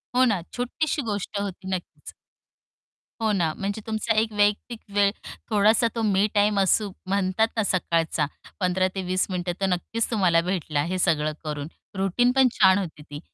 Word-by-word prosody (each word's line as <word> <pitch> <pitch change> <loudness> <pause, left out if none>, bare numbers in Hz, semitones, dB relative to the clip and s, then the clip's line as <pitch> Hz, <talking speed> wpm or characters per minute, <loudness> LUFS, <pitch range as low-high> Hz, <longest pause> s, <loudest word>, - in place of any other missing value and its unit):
हो 255 - +5
ना. 200 -7 +1
छोटीशी 285 +5 -1
गोष्ट 205 0 -3
होती 190 -1 -5
नक्कीच. 175 - -9 1.1
हो 220 -1 +2
ना. 170 -6 +1
म्हणजे 200 +2 -3
तुमचा 220 +1 0
एक 220 0 0
वैयक्तिक 210 +3 +1
वेळ 200 -1 +4 0.4
थोडासा 215 +2 +4
तो 230 - -1
मी 205 0 +3
टाईम 205 0 +3
असू 195 +1 +2 0.2
म्हणतात 195 +3 +1
ना 220 - +2
सकाळचा 165 -5 0 0.3
15 185 0 +2
ते 190 - -2
20 185 +1 0
मिनिटं 180 -1 -2
तर - - +3
नक्कीच 190 +5 -1
तुम्हाला 180 -6 +3
भेटला 165 -5 -1
हे 185 +2 -2
सगळं 155 -2 +1
करून 150 -1 -4 0.3
रूटीन 195 +6 +2
पण 265 -1 +6
छान 190 0 +5
होती 160 -6 -5
ती. 145 -1 -9
195 Hz, 165 wpm, -25 LUFS, 180-215 Hz, 1.1 s, पण